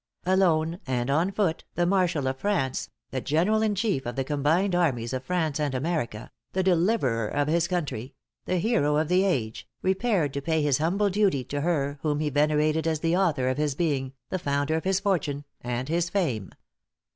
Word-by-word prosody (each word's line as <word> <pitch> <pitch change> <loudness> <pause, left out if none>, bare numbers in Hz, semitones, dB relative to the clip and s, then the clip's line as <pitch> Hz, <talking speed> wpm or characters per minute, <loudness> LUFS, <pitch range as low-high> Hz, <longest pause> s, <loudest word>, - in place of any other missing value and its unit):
Alone, 175 -3 +2
and 125 0 0
on 165 +7 +2
foot, 190 -5 0
the 175 - +2
marshal 180 -6 +1
of 130 0 -2
France, 180 -11 -1 0.2
the 130 - -2
general 180 - +2
in 215 -2 +1
chief 195 - -1
of 120 - -4
the 135 - 0
combined 155 +7 +1
armies 130 -9 +1
of 130 0 -3
France 160 -3 -1
and 145 -3 -1
America, 125 -6 -2 0.2
the 190 - +1
deliverer 170 - +2
of 145 +5 0
his 170 +2 +2
country, 145 -8 -3 0.3
the 185 - 0
hero 175 -7 +2
of 155 +1 0
the 180 +1 +4
age, 120 - -1 0.2
repaired 190 - +1
to 140 - -3
pay 160 +1 0
his 145 -2 +2
humble 195 +6 +1
duty 190 -9 +2
to 145 +3 -4
her 145 -3 0
whom 150 -2 0
he 150 -1 -1
venerated 150 +2 +2
as 160 -2 0
the 165 +1 +2
author 160 -9 +1
of 130 +2 0
his 150 -2 0
being, 135 -5 -1 0.2
the 185 - -1
founder 145 -1 0
of 160 +2 -1
his 190 0 +2
fortune 165 -8 -1 0.2
and 125 +1 -3
his 170 +2 0
fame. 130 - -1
155 Hz, 190 wpm, -26 LUFS, 140-180 Hz, 0.3 s, the